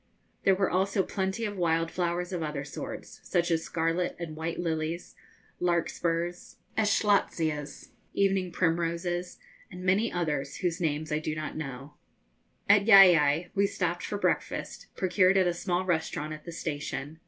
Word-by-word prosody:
There 195 - +5
were 195 0 0
also 190 +2 +1
plenty 190 +4 -2
of 205 -1 -4
wild 165 -2 +1
flowers 175 0 -2
of 175 - -2
other 150 -3 -3
sorts, - - -8
such 175 0 0
as 165 -1 +1
scarlet 165 +2 -1
and 165 -3 -6
white 160 +1 -4
lilies, 165 0 -2 0.5
larkspurs, 170 0 -1 0.2
eschscholtzias, 195 -8 +1 0.3
evening 195 -2 +1
primroses, 170 +1 -1 0.3
and 180 0 -9
many 195 +5 +2
others 150 -5 -2
whose 175 0 -2
names 155 -1 -1
I 150 - +1
do 155 0 -3
not 155 0 -5
know. 140 -1 -7 0.7
At 200 0 +5
Llaillai 175 -6 +7
we 200 0 +3
stopped - - -2
for - - -3
breakfast, - - -2
procured 185 +1 +3
at 190 - +4
a 175 - +1
small 175 +1 -1
restaurant 160 -3 -1
at 155 0 -10
the 170 - -6
station. 145 -2 -5
170 Hz, 150 wpm, -28 LUFS, 155-185 Hz, 0.7 s, Llaillai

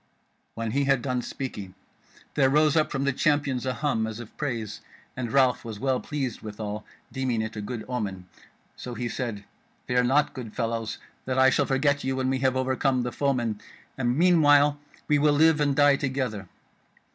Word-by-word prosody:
When 115 -1 -3
he 140 +3 +1
had 135 -3 +2
done 125 -2 -1
speaking 105 -8 -6 0.6
there 135 -3 +3
rose 150 +2 +3
up 155 -1 +2
from 135 -1 -1
the 140 -1 +1
Champions 140 -3 +1
a 130 - 0
hum 115 -4 0
as 110 0 -6
of 120 -3 -10
praise, 115 -7 -4 0.3
and 120 -3 -4
Ralph 130 -2 +3
was 110 -3 -7
well 130 +1 +1
pleased 135 -6 -4
withal, 105 0 -5 0.3
deeming 130 -4 -1
it 110 +1 -6
a 105 - -4
good 110 +1 -5
omen; 100 -7 -4 0.5
so 125 -1 -7
he 120 0 -3
said: 115 -4 -4 0.4
"Fear 125 0 +2
not, 140 +4 +2
good 120 -5 -8
fellows, 115 -2 -2 0.3
that 130 0 -2
I 130 0 +6
shall 140 +2 +2
forget 140 +1 +1
you 130 0 -1
when 130 0 0
we 135 - 0
have 130 -1 +1
overcome 130 0 +1
the 120 - -3
foemen, 120 -7 -1 0.3
and 125 -1 0
meanwhile 145 -4 +5 0.3
we 150 -1 +3
will 150 0 +4
live 155 +1 +4
and 145 -2 +2
die 145 -1 +5
together. 130 -7 -3
130 Hz, 185 wpm, -26 LUFS, 115-140 Hz, 0.6 s, I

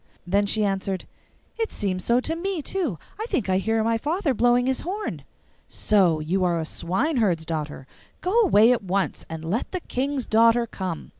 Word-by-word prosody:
Then 200 +3 +2
she 215 +1 +2
answered, 195 -1 -2 0.5
'It 450 - -1
seems 185 -3 -2
so 235 +1 +3
to 325 - -2
me 355 -2 -3
too; 325 - -2 0.2
I 440 - -3
think 215 - -1
I 185 0 +3
hear 225 +2 +1
my 230 0 +1
father 315 - 0
blowing 245 +1 +3
his 265 0 0
horn.' 405 +5 -4 0.5
'So 185 -7 +2
you 175 +5 0
are 175 -2 +1
a 160 - -2
swineherd's 190 - 0
daughter! 150 -4 -4 0.3
Go 365 - -2
away 235 - +6
at 240 -4 +1
once, 195 +1 -2
and 160 0 -6
let 210 +8 -2
the 370 - -2
King's 270 -2 -2
daughter 230 +2 +4
come. 185 -7 -5
220 Hz, 180 wpm, -24 LUFS, 185-265 Hz, 0.5 s, away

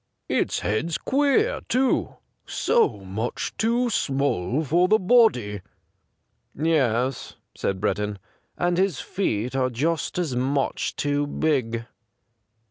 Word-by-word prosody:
Its - - 0
head's 150 +11 -1
queer, 290 - +1
too 260 +1 +1 0.2
— - - -49
so 460 - +1
much 100 +5 -4
too 235 +3 +1
small 140 - 0
for 175 +6 +3
the 215 - +5
body.' 180 - +3 0.5
' - - -47
Yes,' 130 -5 0 0.2
said 95 -1 -2
Breddon, 105 0 -1 0.4
'and 175 0 +1
his 190 -6 +1
feet 125 - -2
are 130 -1 +1
just 155 +10 -1
as 165 -8 -1
much 135 +2 -1
too 145 0 0
big.' 125 -7 -1
145 Hz, 120 wpm, -24 LUFS, 115-185 Hz, 0.5 s, the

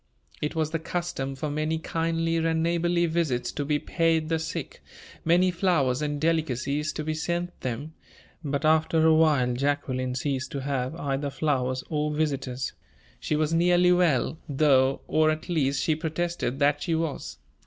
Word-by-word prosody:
It 150 +2 -2
was 155 -1 0
the 165 - -1
custom 165 -5 -3
for 145 +2 -3
many 155 +2 -1
kindly 165 0 -1
and 160 0 +1
neighborly 170 +1 +1
visits 155 -8 0
to 145 - -3
be 145 +1 +1
paid 165 0 0
the 165 -1 +1
sick, 160 - -5 0.4
many 180 +3 +4
flowers 155 -8 +1
and 145 -1 -2
delicacies 150 -2 0
to 155 - -4
be 155 +1 -2
sent 175 +2 -3
them; 130 +6 -4 0.5
but 140 0 -2
after 160 +1 +3
a 160 - +6
while 150 -6 +3
Jacqueline 130 -1 -1
ceased 130 0 -2
to 140 - -3
have 135 +1 -2
either 140 -2 -2
flowers 130 -3 -1
or 150 -1 -1
visitors. 140 -4 -2 0.5
She 155 - -1
was 155 +1 0
nearly 175 +1 +4
well, 165 -4 +2
though, 135 -2 +3
or 155 0 +3
at 155 +3 -3
least 140 -5 +1
she 160 - +2
protested 160 -3 -2
that 145 0 +2
she 170 -3 0
was. 160 -3 -3
155 Hz, 165 wpm, -26 LUFS, 140-165 Hz, 0.5 s, a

